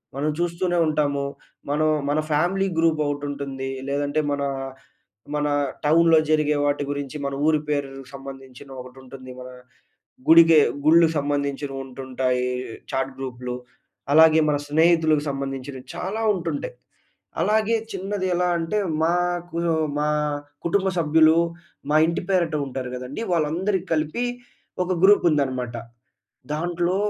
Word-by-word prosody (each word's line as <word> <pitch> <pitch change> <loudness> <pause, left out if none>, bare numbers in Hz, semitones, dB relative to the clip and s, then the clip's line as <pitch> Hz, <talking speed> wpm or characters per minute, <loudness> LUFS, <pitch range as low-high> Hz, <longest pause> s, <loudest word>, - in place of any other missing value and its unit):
మనం 150 +2 -1
చూస్తూనే 175 +1 0
ఉంటాము 145 -2 0 0.4
మనం, 155 +2 +1 0.2
మన 150 - +1
ఫ్యామిలీ 185 +6 +1
గ్రూప్ 165 -1 +2
ఒకటి 145 0 -2
ఉంటుంది. 135 -2 -5 0.2
లేదంటే 145 +1 0
మన, 140 0 -1 0.9
మన 150 0 0 0.4
టౌన్‌లో 165 +1 +5
జరిగే 150 -1 +2
వాటి 145 0 +1
గురించి, 145 0 -4
మన 140 0 -2
ఊరి 155 -1 +3
పేరుకి 135 -2 -3
సంబంధించిన 135 -1 -10
ఒకటి 125 +1 -12
ఉంటుంది. 130 0 -11
మన 125 - -8 0.8
గుడికి 165 -1 +8 0.3
గుళ్లుకు 165 +1 +5
సంబంధించినవి 140 -1 -2
ఉంటుంటాయి 130 -1 -2 0.5
చాట్ 135 0 -1
గ్రూప్‌లు. 125 -2 -5 0.6
అలాగే 160 +1 +7
మన 145 - +2
స్నేహితులకి 160 -1 +3
సంబంధించినవి 135 -1 -5
చాలా 195 +5 -3
ఉంటుంటాయి. 165 -8 -4 0.7
అలాగే 215 +2 +2 0.2
చిన్నది 195 0 -3
ఎలా 180 0 +1
అంటే, 185 +6 -1 0.3
మాకు 175 0 -1 0.4
మా 150 0 +1 0.6
కుటుంబ 190 +3 +1
సభ్యులు 160 0 +5 0.5
మా 155 - +5
ఇంటి 170 +1 -2
పేరుట 170 -4 +1
ఉంటారు 130 -1 -5
కదండీ. 125 - -6
వాళ్ళందరికీ 175 +4 0
కలిపి 155 +10 -1 0.6
ఒక 180 - -3
గ్రూప్ 205 -2 +5
ఉందన్నమాట. 130 -5 -1 0.8
దాంట్లో 175 +3 -1
150 Hz, 120 wpm, -23 LUFS, 135-170 Hz, 0.9 s, గుడికి